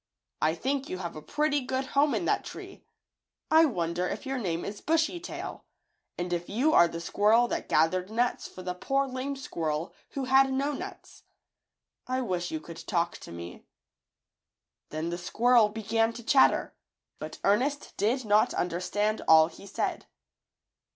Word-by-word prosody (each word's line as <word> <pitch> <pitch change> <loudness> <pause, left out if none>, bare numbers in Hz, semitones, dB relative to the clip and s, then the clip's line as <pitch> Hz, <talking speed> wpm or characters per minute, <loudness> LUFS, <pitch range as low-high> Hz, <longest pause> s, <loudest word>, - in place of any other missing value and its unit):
I 160 +1 +2
think 270 +8 -2
you 185 - -3
have 170 -2 -5
a 155 - -7
pretty 290 - 0
good 260 +1 -2
home 285 +1 +3
in - - -1
that - - +1
tree. - - -10 0.7
I 320 +1 +7
wonder 175 - -1
if - - -5
your 270 -1 -2
name 175 -6 -2
is 205 +1 -6
Bushy 325 +2 +1
Tail, 350 - -7 0.5
and 175 0 -2
if 175 0 -3
you 265 +10 +2
are 170 - +7
the 165 0 -6
squirrel 215 +7 +3
that - - -3
gathered 180 +4 +2
nuts 240 +3 0
for 185 - -11
the 180 0 -2
poor, 275 +9 0
lame 265 +1 -4
squirrel 160 - -3 0.2
who 275 - -2
had 265 +1 +4
no 275 +2 0
nuts. 375 +7 -8 0.9
I 255 +1 0
wish 180 -7 -2
you 155 - -3
could 165 +1 -11
talk 170 -4 0
to - - -11
me." 85 +1 -8 1.3
Then 155 +2 -3
the 175 - -4
squirrel 230 +4 +4
began 225 +1 0
to 235 0 -9
chatter, 265 +4 +4 0.5
but - - -7
Ernest 260 +9 +1
did 230 +5 +1
not 210 0 +3
understand 195 +5 -1
all 160 0 +7
he 195 - -13
said. 195 - -3
215 Hz, 165 wpm, -28 LUFS, 175-265 Hz, 1.3 s, I